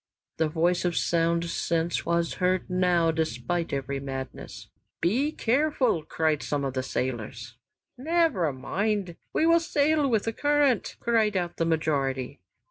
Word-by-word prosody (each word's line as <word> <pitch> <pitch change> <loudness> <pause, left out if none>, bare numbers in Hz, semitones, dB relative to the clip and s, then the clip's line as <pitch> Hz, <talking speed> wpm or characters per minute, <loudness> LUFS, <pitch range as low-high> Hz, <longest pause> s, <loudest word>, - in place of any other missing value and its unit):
The 160 - +2
voice 175 +3 +1
of 175 -2 0
sound 170 0 +1
sense 170 0 -1
was 170 0 +1
heard 185 0 +1
now 180 -2 +3
despite 160 +2 -2
every 140 0 -2
madness: 135 -1 -7 0.3
"Be 255 - +1
careful!" 260 - +1
cried 155 -1 0
some 145 -1 -2
of 135 - -2
the 130 - -1
sailors. 120 -2 -4 0.4
"Never 310 - +2
mind! 195 +6 -2 0.2
We 315 - +1
will 335 +1 +5
sail 300 -2 +2
with 220 -4 +2
the 225 - -2
current," 290 -3 +1
cried 220 -4 +2
out 175 -1 -3
the 165 - +1
majority. 140 - -1
170 Hz, 140 wpm, -27 LUFS, 150-225 Hz, 0.4 s, will